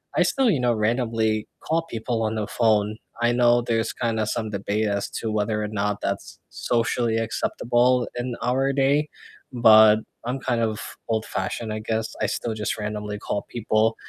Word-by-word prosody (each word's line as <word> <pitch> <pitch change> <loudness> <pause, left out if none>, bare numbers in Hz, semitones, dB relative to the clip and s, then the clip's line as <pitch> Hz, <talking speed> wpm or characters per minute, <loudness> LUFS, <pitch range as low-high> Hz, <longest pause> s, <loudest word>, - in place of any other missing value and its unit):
I - - +4
still, 265 -3 +2
you 155 - +2
know, 120 -1 +3
randomly 110 -1 0
call 165 +1 0
people 115 -5 -3
on 110 0 -1
the 105 -2 -2
phone. 110 -2 +1 0.2
I 120 0 +3
know 120 0 +4
there's 115 -1 -1
kinda 110 -2 -1
some 110 0 -2
debate 105 +2 -1
as 100 -1 -1
to 110 - -3
whether 105 0 0
or - - -2
not 105 -1 -2
that's 100 0 -4
socially 115 -1 0
acceptable 120 +2 +1
in 120 0 -3
our 130 +3 +1
day, 140 +2 +2 0.4
but 110 -3 +7 0.3
I'm 125 +3 -2
kind 120 -3 -1
of 110 -1 -1 0.3
old-fashioned, 110 0 -2
I 110 - -3
guess. 110 +1 -3
I - - +2
still 115 - -2
just 105 -1 -2
randomly 105 -1 -4
call 100 0 -3
people 110 -1 +1
115 Hz, 170 wpm, -24 LUFS, 110-120 Hz, 0.4 s, but